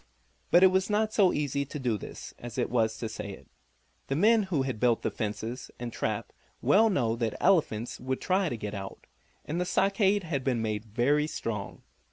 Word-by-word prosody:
But 175 Hz, -, +6 dB
it 190 Hz, -, +7 dB
was 190 Hz, +1 st, +1 dB
not 215 Hz, +1 st, +1 dB
so 190 Hz, -4 st, +5 dB
easy 140 Hz, -1 st, -1 dB
to 140 Hz, +2 st, -7 dB
do 125 Hz, -5 st, 0 dB
this 105 Hz, -, -8 dB
as 120 Hz, 0 st, -8 dB
it 120 Hz, -, 0 dB
was 110 Hz, -2 st, +1 dB
to 115 Hz, -, -3 dB
say 105 Hz, -2 st, -6 dB
it. -, -, -14 dB, 0.6 s
The 135 Hz, -, -1 dB
men 220 Hz, +8 st, +5 dB
who 150 Hz, -7 st, +1 dB
had 130 Hz, -5 st, -3 dB
built 120 Hz, -1 st, +2 dB
the -, -, 0 dB
fences 110 Hz, +3 st, -4 dB
and 120 Hz, -1 st, -5 dB
trap -, -, -3 dB, 0.3 s
well 220 Hz, +3 st, +4 dB
know 120 Hz, -, +1 dB
that 115 Hz, -2 st, -1 dB
the -, -, -9 dB
elephants 145 Hz, -, +2 dB
would 130 Hz, +1 st, -2 dB
try 185 Hz, -1 st, +1 dB
to 120 Hz, -, -4 dB
get 105 Hz, -1 st, -5 dB
out, 95 Hz, -1 st, -7 dB, 0.4 s
and 165 Hz, +5 st, -2 dB
the -, -, +2 dB
stockade 195 Hz, +2 st, +2 dB
had 145 Hz, -6 st, -2 dB
been 125 Hz, -3 st, +1 dB
made 110 Hz, -1 st, -2 dB
very 130 Hz, +7 st, +1 dB
strong. 105 Hz, -9 st, -5 dB
130 Hz, 210 wpm, -29 LUFS, 115-185 Hz, 0.6 s, it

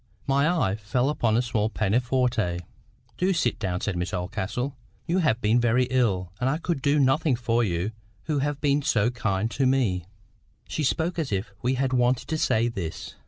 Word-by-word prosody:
My 140 Hz, +3 st, +2 dB
eye 110 Hz, -, +1 dB
fell 125 Hz, +5 st, 0 dB
upon 115 Hz, -7 st, +1 dB
a 120 Hz, -, +2 dB
small 110 Hz, -3 st, 0 dB
pianoforte. 115 Hz, -3 st, 0 dB, 0.6 s
"Do 185 Hz, +2 st, +2 dB
sit 145 Hz, -9 st, 0 dB
down," 90 Hz, -4 st, -2 dB
said 105 Hz, -, -2 dB
Miss 90 Hz, +1 st, -2 dB
Oldcastle.—"You 120 Hz, -, -3 dB
have 150 Hz, -10 st, +2 dB
been 110 Hz, +3 st, +3 dB
very 120 Hz, +2 st, +3 dB
ill, 100 Hz, -9 st, +1 dB
and 125 Hz, +2 st, +1 dB
I 150 Hz, -, +1 dB
could 165 Hz, -4 st, -2 dB
do 145 Hz, +2 st, +2 dB
nothing 135 Hz, +1 st, +3 dB
for 120 Hz, -1 st, +1 dB
you 90 Hz, 0 st, -1 dB, 0.3 s
who 150 Hz, -2 st, -1 dB
have 145 Hz, +1 st, -1 dB
been 145 Hz, 0 st, +2 dB
so 115 Hz, -4 st, +2 dB
kind 110 Hz, -3 st, -1 dB
to 135 Hz, +1 st, +1 dB
me." 110 Hz, -10 st, +1 dB, 0.6 s
She 155 Hz, -, -2 dB
spoke 165 Hz, +5 st, 0 dB
as 150 Hz, -7 st, -2 dB
if 100 Hz, +2 st, -2 dB
she 125 Hz, +2 st, +1 dB
had 130 Hz, 0 st, 0 dB
wanted 125 Hz, 0 st, +2 dB
to 160 Hz, -, -1 dB
say 115 Hz, -3 st, +2 dB
this. 95 Hz, -9 st, -5 dB
125 Hz, 185 wpm, -26 LUFS, 105-135 Hz, 0.6 s, been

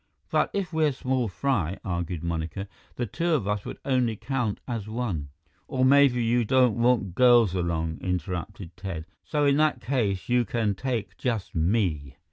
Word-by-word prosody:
"But -, -, +2 dB
if 195 Hz, -4 st, -3 dB
we're 155 Hz, -3 st, +2 dB
small 130 Hz, -2 st, -1 dB
fry," 95 Hz, -, -1 dB
argued 85 Hz, -2 st, -3 dB
Monica, 85 Hz, +3 st, -3 dB, 0.3 s
"the 120 Hz, -, -1 dB
two 165 Hz, -, -1 dB
of 110 Hz, -10 st, -1 dB
us 105 Hz, -1 st, -1 dB
would -, -, -6 dB
only 125 Hz, -4 st, +1 dB
count 125 Hz, -2 st, -2 dB
as 115 Hz, -5 st, -4 dB
one 105 Hz, -11 st, -3 dB, 0.2 s
" 75 Hz, -, -39 dB
"Or 130 Hz, -3 st, +1 dB
maybe 135 Hz, -3 st, +5 dB
you 120 Hz, +1 st, +2 dB
don't 125 Hz, -1 st, +3 dB
want 120 Hz, -6 st, +2 dB
girls 120 Hz, -3 st, +5 dB
along," 80 Hz, -3 st, -1 dB
interrupted 90 Hz, 0 st, -4 dB
Ted, 90 Hz, -4 st, -5 dB, 0.2 s
"so 150 Hz, -1 st, 0 dB
in 140 Hz, 0 st, +4 dB
that 155 Hz, 0 st, +2 dB
case 110 Hz, -8 st, -1 dB
you 125 Hz, 0 st, +3 dB
can 110 Hz, -1 st, 0 dB
take 120 Hz, -1 st, -3 dB
just 115 Hz, -6 st, -2 dB
me." 80 Hz, -, 0 dB
110 Hz, 170 wpm, -26 LUFS, 90-130 Hz, 0.3 s, maybe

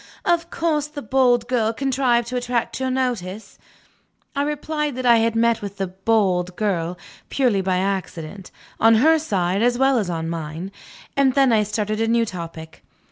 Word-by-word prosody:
"Of 340 Hz, 0 st, +1 dB
course 310 Hz, -4 st, -1 dB
that 290 Hz, -7 st, -10 dB
bold 250 Hz, -3 st, +3 dB
girl 230 Hz, -3 st, +1 dB
contrived 250 Hz, -2 st, +1 dB
to 255 Hz, -, -4 dB
attract 245 Hz, -1 st, -2 dB
your 260 Hz, 0 st, -1 dB
notice?" 235 Hz, -6 st, -3 dB, 0.8 s
I 280 Hz, -, 0 dB
replied 300 Hz, 0 st, -2 dB
that 255 Hz, 0 st, -4 dB
I 235 Hz, -1 st, +6 dB
had 225 Hz, 0 st, +1 dB
met 230 Hz, 0 st, +2 dB
with 200 Hz, -1 st, -7 dB
the 195 Hz, -, -1 dB
"bold 185 Hz, -2 st, 0 dB
girl" 180 Hz, -4 st, -1 dB, 0.3 s
purely 245 Hz, -8 st, +1 dB
by 185 Hz, -1 st, 0 dB
accident, 190 Hz, -1 st, -4 dB, 0.3 s
on 225 Hz, 0 st, +6 dB
her 315 Hz, +8 st, +4 dB
side 195 Hz, -, -1 dB
as 240 Hz, +1 st, +2 dB
well 265 Hz, -1 st, +3 dB
as 200 Hz, -5 st, -2 dB
on 165 Hz, -1 st, -3 dB
mine; 165 Hz, +3 st, -5 dB, 0.4 s
and 275 Hz, -2 st, +3 dB
then 270 Hz, -3 st, +4 dB
I 215 Hz, -, +4 dB
started 215 Hz, +1 st, -2 dB
a 225 Hz, -, +1 dB
new 230 Hz, 0 st, +2 dB
topic. 165 Hz, -4 st, -8 dB
225 Hz, 175 wpm, -22 LUFS, 190-260 Hz, 0.8 s, I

